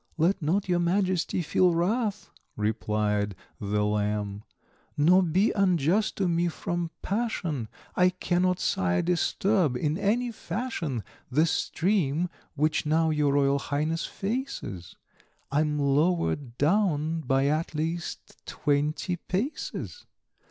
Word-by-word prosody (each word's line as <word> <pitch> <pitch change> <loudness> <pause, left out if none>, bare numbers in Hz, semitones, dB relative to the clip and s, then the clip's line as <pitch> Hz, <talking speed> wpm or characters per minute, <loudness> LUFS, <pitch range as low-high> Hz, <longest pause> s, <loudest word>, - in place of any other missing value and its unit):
"Let 175 +4 +2
not 185 +7 0
your 175 -1 +2
Majesty 180 0 +1
feel 175 +2 +3
wrath," 205 +4 0 0.2
replied 105 -1 0 0.2
The 105 0 0
Lamb, 105 -1 -1 0.6
"nor 175 +6 +5
be 185 +4 +2
unjust 190 +1 +2
to 190 - 0
me, 170 0 +1
from 170 0 -3
passion; 185 - -2 0.3
I 180 0 +5
cannot, 180 0 0
Sire, 90 -1 +1
disturb 180 - +1
in 150 +6 -1
any 235 +4 +1
fashion 170 - -3 0.3
The 150 +5 +3
stream 170 -1 0 0.3
which 155 +1 +1
now 160 +1 +2
your 150 -2 +2
Royal 140 0 +3
Highness 155 +4 -1
faces, 200 - -4 0.6
I'm 150 +1 +1
lower 150 +5 +2
down 155 - 0
by 135 -1 +1
at 155 +2 0
least 165 +2 -4
twenty 150 +5 0
paces." 240 - -4
165 Hz, 115 wpm, -27 LUFS, 140-185 Hz, 0.6 s, nor